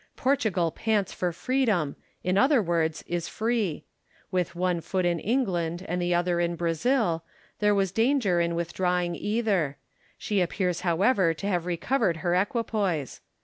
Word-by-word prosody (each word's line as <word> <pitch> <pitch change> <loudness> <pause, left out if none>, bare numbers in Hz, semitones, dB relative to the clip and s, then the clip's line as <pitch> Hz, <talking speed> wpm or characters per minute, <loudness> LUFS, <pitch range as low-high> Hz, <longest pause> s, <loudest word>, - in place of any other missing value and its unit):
Portugal 220 - +1
pants 210 -1 0
for 180 -1 -1
freedom, 210 - 0 0.3
in 185 +1 +1
other 265 +6 +5
words 165 -5 0
is 175 -1 -3
free. 220 -7 -1 0.5
With 180 -2 -1
one 180 -1 0
foot 185 +2 -1
in 170 -1 +1
England 180 -7 -1
and 180 +1 -1
the 175 0 0
other 175 0 +1
in 170 0 0
Brazil, 170 - +1 0.4
there 210 -1 +3
was 195 -2 +1
danger 225 -5 +2
in 170 0 0
withdrawing 175 +1 0
either: 200 -9 0 0.4
she 205 -3 0
appears 180 -1 -1
however 185 0 +2
to 155 - -7
have 180 -4 0
recovered 180 +1 0
her 175 - +2
equipoise. 195 - -1
180 Hz, 145 wpm, -27 LUFS, 170-210 Hz, 0.5 s, other